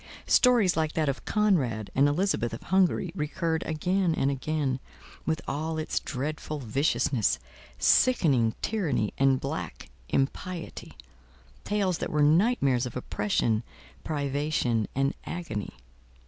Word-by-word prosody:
Stories 235 -8 +4
like 155 -1 0
that 155 -2 0
of 135 -1 -2
Conrad 140 - +1
and 140 +2 +4
Elizabeth 145 -7 0
of - - -11
Hungary, 185 -2 +2
recurred 160 0 -1
again 175 +2 +1
and 135 - +1
again, 140 -1 -1 0.5
with 160 0 0
all 160 +3 -2
its 155 - -1
dreadful 150 +3 -4
viciousness, 130 - +1 0.4
sickening 135 - +3
tyranny 160 - 0
and 135 -1 +4
black 90 - -5 0.2
impiety: 165 +6 -3 0.7
tales 195 -4 0
that - - -3
were 150 -1 +2
nightmares 145 - +3
of 120 - -9
oppression, 110 -1 0 0.4
privation, 140 -6 0
and 135 +1 +1
agony. 135 - -5
150 Hz, 120 wpm, -28 LUFS, 130-170 Hz, 0.7 s, Stories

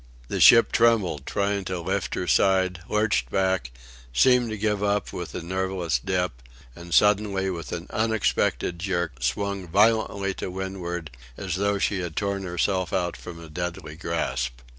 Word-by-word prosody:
The - - -2
ship 115 - +8
trembled, 105 -11 +2
trying 100 0 0
to 90 0 -3
lift 85 - -2
her - - -2
side, 95 -2 +2
lurched 105 - +1
back, 95 -3 0 0.4
seemed 125 - +4
to 110 - -4
give 105 -1 0
up 105 0 0
with 90 - -6
a 85 - -4
nerveless 95 -2 -1
dip, 90 -10 -1 0.3
and 85 0 -11
suddenly 100 -1 +3
with 85 -2 -6
an 85 0 -4
unexpected 110 -5 0
jerk 85 -8 -2
swung 100 +8 -2
violently 100 0 +2
to - - -3
windward, 90 -3 -5 0.3
as 95 -3 -4
though 100 +2 +1
she 100 0 0
had 85 -3 -5
torn 100 -1 -1
herself 95 0 -1
out 90 -2 -1
from 85 -2 -9
a 85 - -10
deadly 85 0 -5
grasp. 65 -7 -3
95 Hz, 160 wpm, -25 LUFS, 85-100 Hz, 0.4 s, ship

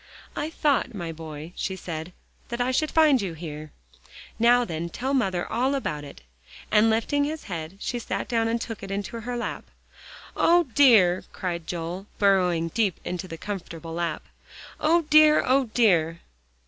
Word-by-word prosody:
"I 295 +2 -2
thought, 285 -6 0
my 170 -4 -4
boy," 160 0 -8
she 190 - -3
said, 165 -2 -6 0.4
"that 235 0 -4
I 245 +1 +1
should 305 +4 +1
find 305 -6 +4
you 190 -4 -3
here. 155 -2 -8 0.7
Now 240 +1 +5
then, 170 -2 -4
tell 260 +10 -3
mother 190 -9 0
all 260 +3 0
about 150 - -3
it," 140 - -12 0.5
and 215 +1 +5
lifting 230 +6 +1
his 310 +2 -3
head, 170 -1 -6
she 240 +3 -3
sat - - -4
down 230 -2 +1
and 230 +1 0
took 225 -2 -6
it 195 - -7
into 200 +3 -4
her 245 +1 -4
lap. 240 - -4 0.7
"O 345 +1 +4
dear!" 210 -10 +5
cried 170 -3 -4
Joel, 175 +3 -5
burrowing 180 -4 +2
deep 205 -1 0
in 180 - -3
the 170 -2 -7
comfortable 170 -4 -6
lap, 170 -2 -2 0.6
"O 335 +2 +3
dear 305 0 +6
O 265 +1 +3
dear!" 175 -8 +2
200 Hz, 165 wpm, -25 LUFS, 170-250 Hz, 0.7 s, dear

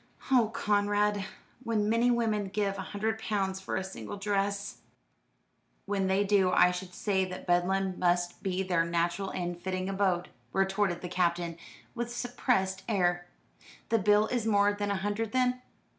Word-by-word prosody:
"Oh, 240 -5 +5
Conrad, 205 -1 +1 0.4
when 220 -3 0
many 230 +3 +3
women 225 -4 +1
give 195 0 -1
a 190 - -6
hundred 220 +2 -2
pounds 195 -3 -1
for - - -4
a 190 - -1
single 190 +1 -7
dress!" 200 0 -1 1.1
"When 195 -1 0
they 190 +2 +2
do 195 -2 +3
I 180 - +5
should 180 0 -6
say 195 -3 +1
that 185 0 -7
Bedlam 185 +1 +1
must 175 0 +1
be 190 0 -1
their 175 -3 +2
natural 170 +3 -1
and 175 -1 -4
fitting 185 0 -2
abode," 190 -3 0 0.2
retorted 195 -2 +1
the 180 - -4
Captain, 175 -1 0 0.4
with 240 -1 -4
suppressed 240 -6 0
ire. 175 -4 +1 0.6
"The 225 - +3
bill 210 +1 +4
is 240 -3 -1
more 205 -1 +4
than 205 0 -2
a 200 - +1
hundred 205 +3 -2
then? 250 -1 +1
195 Hz, 160 wpm, -30 LUFS, 185-210 Hz, 1.1 s, Oh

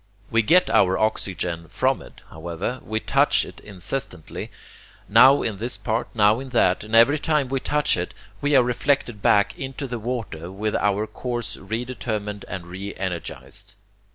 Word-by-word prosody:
We 115 0 +4
get 175 +12 +5
our 95 0 +3
oxygen 90 -6 -1
from - - 0
it, - - -15
however, 85 +10 -4
we 110 0 -2
touch - - +3
it - - -12
incessantly, 95 - -6 0.6
now 130 +6 +7
in 110 -3 -1
this 120 +5 -1
part, 115 0 -1
now 105 +1 +4
in 135 0 -7
that, 100 -7 +2
and 110 +1 -2
every 140 +7 +6
time 150 -4 +1
we 135 0 0
touch 150 +3 +1
it 90 0 -4 0.3
we 145 0 +2
are 130 - +7
reflected 125 -2 0
back 100 0 +3
into 135 +1 -4
the 120 -2 -4
water 110 -8 -4
with 105 +2 -2
our 105 +1 +1
course 120 0 -4
re 110 +5 -4
determined 105 -5 -4
and 90 -1 -6
re 95 +3 -7
energized. 90 -4 -6
110 Hz, 165 wpm, -23 LUFS, 95-125 Hz, 0.6 s, now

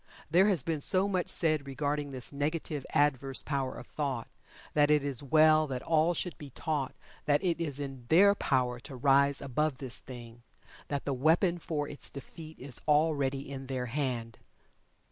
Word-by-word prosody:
There 185 +4 +5
has 185 -10 +1
been 160 -1 -2
so 190 +5 +5
much 185 -3 -1
said 155 -4 +1
regarding 145 +1 -2
this 130 0 -3
negative, 150 0 -3
adverse 135 -2 +1
power 135 -3 -2
of - - -9
thought, 135 -6 -3 0.5
that 145 -1 +4
it 150 -1 +4
is 140 -4 -2
well 155 +2 +4
that 130 -3 -4
all 165 +2 +2
should 180 - -3
be 145 - -9
taught 145 0 -3 0.3
that 145 -1 +2
it 170 -2 0
is 145 -4 -2
in 135 -3 -6
their 200 +7 +6
power 125 -9 0
to 140 +2 -9
rise 140 +2 +3
above 140 +1 -1
this 130 -3 -2
thing 120 -2 -11 0.5
that 145 -1 -3
the 140 - 0
weapon 165 +6 +2
for 150 -3 -3
its 145 - -8
defeat 155 +3 -10
is 130 -2 -3
already 145 -3 +2
in 135 -1 -7
their 130 -2 -3
hand. 120 -4 -3
145 Hz, 175 wpm, -30 LUFS, 135-155 Hz, 0.5 s, their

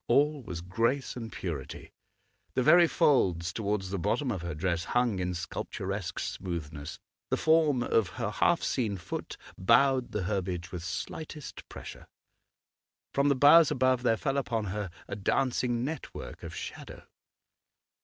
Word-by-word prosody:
All 145 +4 +3
was 90 -8 -6
grace 115 +9 0
and 115 -3 -6
purity; 75 -8 -6 0.6
the 130 - +2
very 175 +5 +7
folds 90 - +2
towards 100 -3 -2
the 100 - -2
bottom 120 - 0
of 95 -6 -3
her 85 -2 -4
dress 85 +1 -1
hung 120 -2 +1
in 90 0 -1
sculpturesque 95 +2 -4
smoothness; 80 -5 -5 0.3
the - - +1
form 155 -5 +3
of 110 -5 +2
her 100 - -1
half 170 +9 +2
seen 110 -7 0
foot 90 - -6 0.2
bowed 125 +6 +4
the 105 - -2
herbage 90 -2 -2
with 85 -1 -3
lightest 155 -2 -8
pressure. - - -9 1.1
From 140 +1 +3
the 140 - +4
boughs 145 +4 +7
above 130 -3 +2
there 115 -2 +2
fell 135 +2 -1
upon 115 -4 -2
her 105 -2 -3 0.2
a - - -4
dancing 120 +2 0
network 155 +3 -6
of - - -7
shadow. - - -8
115 Hz, 145 wpm, -29 LUFS, 90-135 Hz, 1.1 s, very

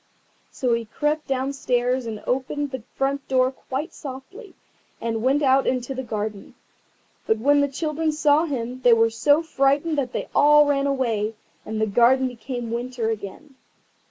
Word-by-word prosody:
So 250 -3 -1
he 230 0 -1
crept 295 +7 -2
downstairs 255 -2 -1
and 215 -2 -6
opened 270 +3 -2
the 260 -2 -5
front 275 +1 -1
door 255 -1 +2
quite 270 +4 -5
softly, 305 - -10 0.4
and 225 -1 -2
went 275 +5 +2
out 270 0 +3
into 255 +1 -1
the 260 - -4
garden. 215 -4 -5 0.7
But 220 - +2
when 285 +5 +3
the 285 - +2
children 310 +3 -2
saw 300 +1 +3
him 255 -4 -4
they 245 -2 +6
were 225 0 +3
so 290 +8 +3
frightened 290 +1 +1
that 255 -3 -2
they - - -4
all 295 0 +6
ran 280 -1 +1
away, 225 -6 -1 0.3
and 220 0 -3
the 220 - +2
garden 245 +5 +3
became 245 -1 -6
winter 240 -1 -2
again. 220 +7 -7
260 Hz, 160 wpm, -23 LUFS, 235-285 Hz, 0.7 s, they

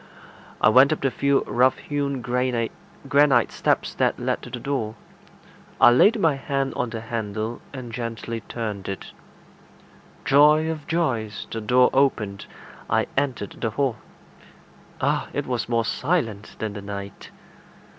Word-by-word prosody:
I - - +5
went 130 +6 +6
up 155 - -1
the 135 - +1
few 140 +1 +2
rough 125 +2 +2
hewn 140 -3 -3
granite 125 -1 0 0.8
steps - - 0
that - - +1
led - - -2
to - - -9
the 120 0 -6
door. 115 -5 -2 0.8
I - - +8
laid 205 - +5
my 160 -5 +3
hand 135 -1 -2
on 125 - -2
the 115 -1 -5
handle, 110 0 -4
and 130 -4 -7
gently 115 -1 -4
turned 105 -3 -5
it. 95 - -6 1.1
Joy 150 +3 +5
of 155 -2 -7
joys! 125 -11 -1
the 115 - -4
door 125 +3 +4
opened. 110 -8 +1 0.4
I - - +2
entered 130 -7 -2
the 115 - 0
hall. 125 +1 -1 1.0
Ah! - - 0
it - - -2
was 125 -2 -2
more 115 -1 +1
silent 115 - -1
than 110 -2 -4
the 100 - -7
night. 100 -1 -7
120 Hz, 145 wpm, -24 LUFS, 110-140 Hz, 1.1 s, I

